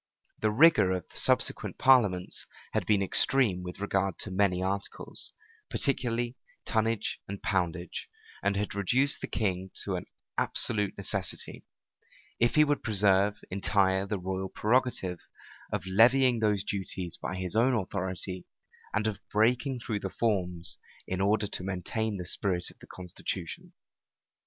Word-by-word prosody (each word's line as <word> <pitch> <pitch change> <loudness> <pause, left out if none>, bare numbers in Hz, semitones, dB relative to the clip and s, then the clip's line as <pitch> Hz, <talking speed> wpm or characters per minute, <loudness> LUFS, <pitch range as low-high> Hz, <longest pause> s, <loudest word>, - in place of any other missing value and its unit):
The 110 - +2
rigor 120 - +5
of 90 -2 -4
the - - -10
subsequent - - +1
parliaments 105 -9 +3 0.3
had - - 0
been 105 -2 +3
extreme 100 -1 +3
with 90 +1 -7
regard 95 -2 0
to 100 - -4
many 95 -1 +2
articles, 100 +1 -2 0.4
particularly 120 -2 0 0.3
tonnage 110 -2 0
and 100 0 -5
poundage; 90 -2 -2 0.3
and 100 0 +1
had 105 +1 -2
reduced 125 +9 +1
the - - -3
king 95 -3 -1
to - - -2
an - - -7 0.3
absolute 105 -4 +2
necessity, 100 -1 -3 0.7
if 120 0 +3
he 150 - +7
would 145 -1 +1
preserve 100 -1 +2
entire 95 0 +2
the 105 0 -1
royal 95 +1 -3
prerogative, 110 -6 0 0.5
of - - -2
levying 120 +5 +5
those 105 -3 +2
duties 95 -3 -3
by - - -3
his 95 +1 -2
own 125 +3 +4
authority, 95 -2 -3 0.5
and 105 0 +1
of 110 -3 -1
breaking 125 +5 +2
through 110 -3 -3
the 95 - -4
forms, 90 -6 -1 0.3
in 95 0 -2
order 105 +2 +2
to 100 -2 -4
maintain 100 +3 -2
the 90 - -5
spirit 90 -1 -1
of - - -24
the - - -14
constitution. 90 -1 -6
100 Hz, 140 wpm, -29 LUFS, 95-110 Hz, 0.7 s, he